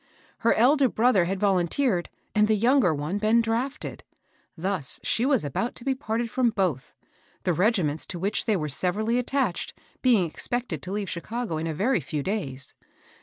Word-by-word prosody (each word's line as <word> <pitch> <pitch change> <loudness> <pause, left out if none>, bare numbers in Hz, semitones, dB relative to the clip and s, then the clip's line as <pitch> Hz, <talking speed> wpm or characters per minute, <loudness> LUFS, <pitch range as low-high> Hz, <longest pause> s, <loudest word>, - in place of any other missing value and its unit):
Her 230 - +3
elder 265 +3 +4
brother 220 -7 +3
had 190 +2 -2
volunteered 190 +1 +1 0.2
and 210 0 +4
the 220 - +3
younger 235 - +3
one 155 +6 -2
been 215 +2 +3
drafted; 235 +6 -2 0.5
thus 180 -4 0
she 240 +3 +1
was 265 - +2
about 190 - -2
to - - -8
be 270 - +2
parted 235 -3 -2
fipom 245 -4 +1
both, 175 - -1 0.5
the 180 - +1
regiments 175 -5 +1
to 180 - -5
which 195 +5 -1
they 215 -4 +2
were 155 -3 -2
sev 180 +6 -1
erally 225 +3 +1
attached 250 -6 -1 0.3
being 235 -8 +4
expected 190 - -3
to 185 - -6
leave 205 0 -2
Chicago 215 +1 -4
in 160 +1 -3
a 160 - -2
very 225 - +2
few 145 0 -4
days. 140 -10 -1
210 Hz, 175 wpm, -26 LUFS, 175-240 Hz, 0.5 s, elder